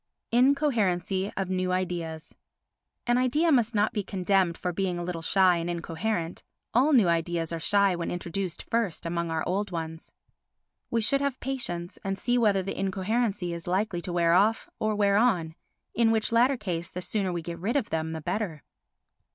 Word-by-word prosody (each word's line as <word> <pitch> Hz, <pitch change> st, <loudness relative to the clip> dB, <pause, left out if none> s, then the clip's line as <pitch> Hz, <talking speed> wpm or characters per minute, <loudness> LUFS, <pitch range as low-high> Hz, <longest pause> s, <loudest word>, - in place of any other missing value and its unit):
Incoherency 215 Hz, -, +2 dB
of 190 Hz, -1 st, -2 dB
New 185 Hz, 0 st, 0 dB
Ideas 170 Hz, -3 st, -3 dB, 0.7 s
An 240 Hz, +1 st, +3 dB
idea 295 Hz, +7 st, +2 dB
must 240 Hz, -4 st, +2 dB
not 210 Hz, +1 st, +2 dB
be 210 Hz, -, 0 dB
condemned 190 Hz, -2 st, +1 dB
for 180 Hz, -1 st, -3 dB
being 185 Hz, -1 st, -1 dB
a 175 Hz, -, -3 dB
little 170 Hz, -1 st, -4 dB
shy 185 Hz, +1 st, +4 dB
and 170 Hz, +1 st, -3 dB
incoherent; 170 Hz, +1 st, -3 dB, 0.3 s
all 265 Hz, +6 st, +4 dB
new 235 Hz, -10 st, +5 dB
ideas 170 Hz, 0 st, 0 dB
are 165 Hz, -, -3 dB
shy 200 Hz, +2 st, +3 dB
when 170 Hz, -1 st, -3 dB
introduced 175 Hz, +1 st, -4 dB
first 225 Hz, -8 st, -1 dB
among 170 Hz, 0 st, -2 dB
our 160 Hz, -1 st, -2 dB
old 200 Hz, +3 st, -1 dB
ones. 160 Hz, -2 st, -6 dB, 0.8 s
We 230 Hz, -, +1 dB
should 275 Hz, +6 st, +2 dB
have 280 Hz, -2 st, -1 dB
patience 180 Hz, -10 st, -3 dB
and 195 Hz, 0 st, -2 dB
see 245 Hz, +4 st, +1 dB
whether 205 Hz, -4 st, +3 dB
the 195 Hz, -, -5 dB
incoherency 195 Hz, -1 st, -1 dB
is 170 Hz, 0 st, -7 dB
likely 185 Hz, 0 st, 0 dB
to 180 Hz, -, -5 dB
wear 170 Hz, -1 st, +3 dB
off 210 Hz, +5 st, +3 dB
or 215 Hz, 0 st, +1 dB
to -, -, -2 dB
wear 200 Hz, -1 st, +3 dB
on, 185 Hz, -9 st, +2 dB, 0.4 s
in 230 Hz, 0 st, +3 dB
which 220 Hz, 0 st, +1 dB
latter 245 Hz, +4 st, +4 dB
case 175 Hz, -6 st, -3 dB
the 180 Hz, -, -6 dB
sooner 195 Hz, -2 st, -1 dB
we 170 Hz, -1 st, -3 dB
get 170 Hz, 0 st, -6 dB
rid 215 Hz, +9 st, -1 dB
of 275 Hz, -7 st, 0 dB
them 160 Hz, 0 st, -1 dB
the 160 Hz, -, -5 dB
better. 175 Hz, -2 st, -3 dB
190 Hz, 185 wpm, -27 LUFS, 170-220 Hz, 0.8 s, new